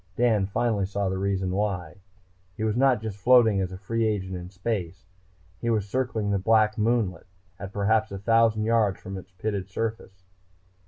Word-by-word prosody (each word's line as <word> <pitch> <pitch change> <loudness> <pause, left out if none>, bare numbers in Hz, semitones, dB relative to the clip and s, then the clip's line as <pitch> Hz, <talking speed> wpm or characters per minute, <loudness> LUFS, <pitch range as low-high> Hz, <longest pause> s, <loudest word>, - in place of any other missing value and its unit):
Dan 110 -4 +2
finally 105 -2 0
saw 100 -1 -1
the 95 0 -2
reason 95 -1 -1
why. 95 -2 -2 0.6
He - - -3
was 110 -1 0
not 125 -3 +3
just 105 -2 -5
floating 115 -3 +5
as 95 -1 -2
a 95 - -7
free 115 +4 -2
agent 100 -4 -1
in 90 0 -7
space. 95 -2 -4 0.5
He 120 - -2
was 105 -3 0
circling 110 -3 -1
the 100 - +1
black 110 +1 +3
moonlet, 105 -7 0 0.3
at 100 -1 -7
perhaps 105 +2 +1
a 100 - -4
thousand 115 +1 +3
yards 110 -3 +2
from 95 - -7
its 95 0 -9
pitted 100 +1 -4
surface. 100 -3 -5
105 Hz, 175 wpm, -26 LUFS, 95-115 Hz, 0.6 s, floating